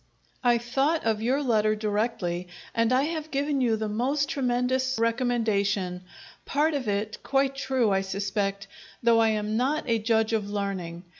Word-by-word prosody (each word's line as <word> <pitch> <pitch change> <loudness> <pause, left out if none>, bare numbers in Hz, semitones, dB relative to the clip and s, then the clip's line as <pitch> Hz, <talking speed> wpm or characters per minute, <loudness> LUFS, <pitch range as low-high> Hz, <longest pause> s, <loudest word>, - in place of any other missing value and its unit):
I 240 -1 +4
thought 270 +7 0
of 220 -1 +1
your 260 +5 +1
letter 215 -4 +2
directly, 205 -5 -2 0.3
and 230 +1 +2
I 255 +2 +4
have 315 0 -3
given 280 -1 0
you 235 -3 +3
the 220 0 -2
most 260 +7 0
tremendous 260 0 0
recommendation 220 -6 0 0.4
part 305 +3 +1
of 275 -5 -2
it 210 +1 -2
quite 275 0 +1
true, 260 -5 +1
I 195 0 +2
suspect, 195 +1 -2 0.4
though 230 -1 +5
I 225 - +4
am 215 0 -1
not 280 +6 +1
a 230 -2 +2
judge 220 0 +1
of 210 -2 -1
learning. 190 -4 -4
230 Hz, 160 wpm, -26 LUFS, 205-260 Hz, 0.4 s, though